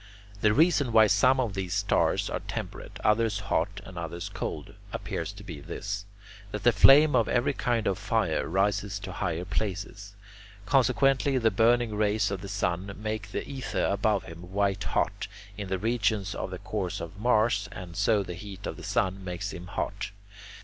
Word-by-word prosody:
The 105 - +5
reason 145 -1 +3
why 110 -1 +7
some 115 +6 +4
of 120 -6 0
these 95 -3 -3
stars - - +2
are - - -2
temperate, - - -6
others 105 -1 +3
hot, 100 -1 -1
and 90 -2 -8
others 85 +1 -5
cold, - - -5 0.2
appears 85 +4 -4
to 100 0 -11
be 85 -7 -7
this: 100 +6 -5 0.5
that 105 - -5
the 120 - +6
flame 135 +7 +7
of 115 -3 +3
every 125 +3 +2
kind 120 -4 0
of 95 -2 0
fire - - 0
rises 100 +2 0
to 95 -1 -7
higher 85 -1 -2
places. 100 0 -4 0.5
Consequently, 135 +2 +3
the 115 -3 +3
burning 115 +2 +3
rays 105 -1 +1
of 95 -2 -3
the 100 - -7
sun 95 -1 -1
make 110 0 -4
the - - -3
ether 135 -2 -2
above 100 0 +1
him 85 +2 -11
white 100 0 0
hot, - - -1 0.3
in 100 -1 -5
the 95 0 -1
regions 105 -2 0
of - - -4
the 95 - -5
course 95 -1 -3
of 85 +4 -8
Mars, 110 -3 +2
and 90 -2 -8
so 105 0 +2
the 90 - -6
heat 100 +2 -9
of - - -4
the - - -10
sun 95 0 0
makes 95 +2 -4
him 90 0 -8
hot. 100 +2 -3
100 Hz, 180 wpm, -28 LUFS, 95-110 Hz, 0.5 s, why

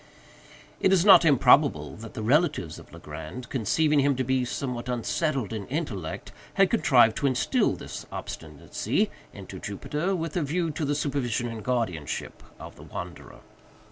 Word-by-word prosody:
It 190 - +3
is 190 -1 +4
not 195 -3 +9
improbable 140 - +4
that 115 0 -10
the 110 - -4
relatives 125 - +1
of - - -16
Legrand, 80 +11 -8
conceiving 150 +5 +2
him 140 0 +3
to 130 - -1
be 130 0 +1
somewhat 125 -1 -4
unsettled 125 - -1
in 105 -3 -5
intellect, 120 - -4 0.2
had - - +4
contrived 110 0 +5
to 140 - +1
instil 130 -2 +1
this - - -8
obstinacy 75 -3 -3 0.2
into - - -9
Jupiter, 175 +6 -2
with 165 -3 -4
a 175 - +1
view 160 +3 -1
to 150 +1 -3
the 145 +1 0
supervision 135 -5 -1
and 115 -2 -7
guardianship 110 - -3 0.2
of - - -10
the - - -12
wanderer. - - -8
130 Hz, 155 wpm, -26 LUFS, 110-150 Hz, 0.2 s, not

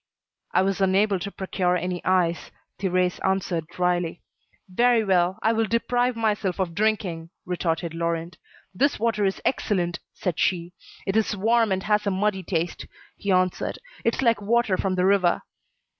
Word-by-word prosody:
"I 185 - +3
was 195 0 -1
unable 195 +1 +3
to 200 - -4
procure 185 -2 0
any 180 0 -3
ice," 180 -2 +1 0.3
Thérèse 185 -2 +1
answered 185 -4 0
dryly. 175 -1 -1 0.4
"Very 235 +4 +3
well, 185 -1 +2
I 225 - +3
will 225 -1 +1
deprive 245 +2 +1
myself 210 -5 0
of 180 -3 -1
drinking," 190 -5 -1 0.2
retorted 170 -2 -2
Laurent. 170 +1 -3 0.3
"This 280 +10 +2
water 215 -2 +1
is 195 - 0
excellent," 175 -9 0 0.2
said 180 -4 -3
she. 175 -1 0 0.3
"It 195 - -1
is 220 -1 +1
warm, 225 +1 +3
and 190 0 0
has 210 -1 +1
a - - +4
muddy 195 0 0
taste," 170 -1 -3 0.3
he 200 - -2
answered. 185 -1 +1 0.3
"It's 230 +3 +1
like 230 -3 +3
water 225 -1 +2
from 185 0 -1
the 180 0 +2
river." 190 -3 +3
190 Hz, 160 wpm, -25 LUFS, 180-210 Hz, 0.4 s, a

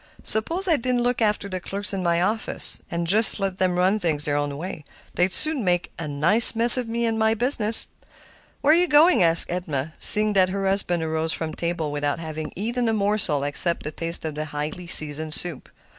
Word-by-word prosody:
Suppose 330 - -4
I 330 -4 +1
didn't 245 -1 -3
look 245 0 -3
after 210 -2 -2
the 185 -1 -7
clerks 200 +3 -6
in 195 - -5
my 170 -1 -2
office, 220 +3 -4 0.2
just 210 +6 +1
let 195 -1 -5
them 185 -1 -2
run 190 +4 -1
things 160 -6 -4
their 145 -1 -4
own 145 -1 -5
way; 165 -1 -9 0.3
they'd 180 +1 -2
soon 305 - 0
make 175 -2 -3
a 165 - -7
nice 170 +12 +5
mess 235 +1 +12
of 250 -2 -4
me 235 +1 -4
and 225 -1 -4
my 220 0 -1
business." 230 -2 -2 0.8
"Where 300 - +2
are - - +3
you 355 +1 0
going?" 305 - +2
asked 165 -1 +3
Edna, 155 -4 -6
seeing 210 0 +6
that 185 -2 0
her 195 +1 -5
husband 180 -3 -2
arose 160 +1 -4
from 160 -2 -6
table 170 -3 -6
without 145 0 -4
having 155 -1 -9
eaten 235 +4 -4
a - - -2
morsel 200 -9 -2
except 145 +4 -2
a 150 - -6
taste 165 +1 -2
of 155 - -6
the 155 +1 -7
highly 150 +4 -8
seasoned 155 -1 +3
soup. 175 -6 +3
185 Hz, 205 wpm, -20 LUFS, 160-220 Hz, 0.8 s, mess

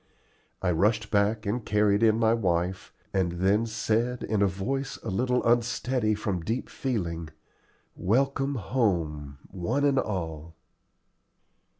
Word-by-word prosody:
I 90 - +2
rushed 105 +5 +1
back 105 +1 +2
and 110 +4 -1
carried 105 -1 +2
in 110 -1 +4
my 115 0 +3
wife, 90 -4 -1 0.2
and 90 -3 +1
then 100 +6 +2
said, 115 +3 -1
in 110 -2 0
a 100 - +5
voice 125 +9 -3
a - - -4
little 125 +5 +1
unsteady 120 -1 +1
from 100 -4 -2
deep 115 +9 -3
feeling, 85 - -3 0.7
"Welcome 135 +7 +1
home, 85 - -1
one 115 +11 -1
and 140 -2 +3
all." 80 - -4
105 Hz, 125 wpm, -27 LUFS, 90-120 Hz, 0.7 s, a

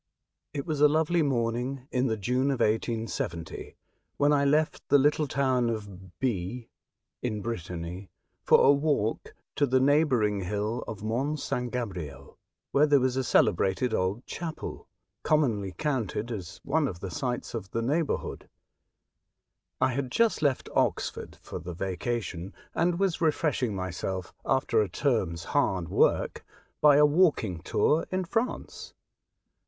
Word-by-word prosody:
IT 140 - -3
was 150 -3 -2
a 150 - +9
lovely 160 +3 +2
morning 125 0 -1
in 130 +1 +1
the 110 -2 -1
June 125 +7 0
of 135 -3 0
1870, 110 -6 -2 0.4
when 145 +1 +4
I 140 -1 +3
left 150 +2 +2
the 145 - +7
little 150 +2 +2
town 130 -3 +1
of 100 -5 -7
B, 115 -1 -2 0.5
in 110 -4 -2
Brittany, 90 -4 -5 0.3
for - - +5
a - - +8
walk 140 -6 0 0.2
to 145 - +3
the 130 +1 +3
neighbouring 130 -7 +3
hill 105 +5 -2
of 105 -1 -7
Mont 135 +8 -1
St. 125 -2 -2
Gabriel, 85 - -6 0.3
where 150 +2 +4
there 145 -1 +5
was 130 0 +1
a 130 - 0
cele - - +4
brated 105 +5 0
old 95 +5 -1
chapel, 165 -2 -6 0.3
commonly 115 -11 +1
counted 120 - -2
as 95 -7 -6
one 150 +1 +1
of 90 -8 -6
the 95 0 -6
sights 125 -4 -3
of 105 -5 -5
the 115 +3 -2
neighbourhood. 150 +5 -1 1.3
I - - +3
had 130 +1 -2
just 230 - +2
left 140 -4 +1
Oxford - - -1
for - - -6
the 85 +1 -7
vacation, 95 0 -3 0.2
and 170 +1 +1
was 190 -3 0
refreshing 150 -8 +1
myself, 95 0 -4
after 120 -4 +2
a 105 - -1
term's 90 - 0
hard 90 -4 0
work, - - +2 0.4
by 150 -1 +7
a 150 +1 +7
walking 145 - +2
tour 150 - +1
in 185 0 -1
France. 225 +7 -3
125 Hz, 145 wpm, -28 LUFS, 100-145 Hz, 1.3 s, a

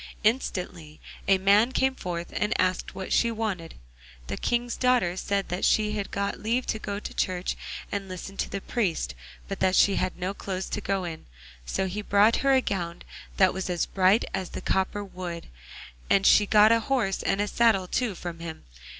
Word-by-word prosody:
Instantly 180 -9 -1 0.3
a 195 0 +5
man 200 +5 +4
came 265 0 +2
forth 175 -7 -5
and 210 +2 0
asked 185 0 0
what 190 -1 -4
she 235 - +3
wanted. 215 -7 -3 0.5
The 70 - -4
King's 240 0 -1
daughter 250 -9 +2
said 200 +1 -1
that 180 +1 -3
she 210 -1 +3
had 205 -2 -3
got 200 0 -2
leave 235 +4 0
to 220 - -6
go 200 -1 -4
to - - -7
church 180 -1 -1 0.4
and 200 -1 -3
listen 185 +2 -7
to - - -2
the 195 - -4
priest, 175 - -1 0.3
but - - -5
that 190 0 +2
she 200 - +4
had 185 - -1
no 185 +2 -2
clothes 190 -2 -4
to 210 - -3
go 195 -1 -1
in. 165 -2 -7 0.4
So 190 - -1
he 195 +3 -3
brought 205 +2 +4
her 275 0 +3
a 260 - +5
gown 175 -6 -3 0.3
that 190 -1 +5
was 190 0 -4
as 175 -2 0
bright 190 +3 +3
as 185 -2 -3
the - - -6
copper 190 +2 0
wood, 180 -3 -7 0.6
and 195 0 +4
she 210 - +6
got 215 +1 +6
a 230 - +5
horse 225 -5 0
and 205 +1 0
saddle 210 -4 +3
too 230 0 -1
from 170 -1 -6
him. 165 -1 -7
195 Hz, 195 wpm, -27 LUFS, 185-215 Hz, 0.6 s, she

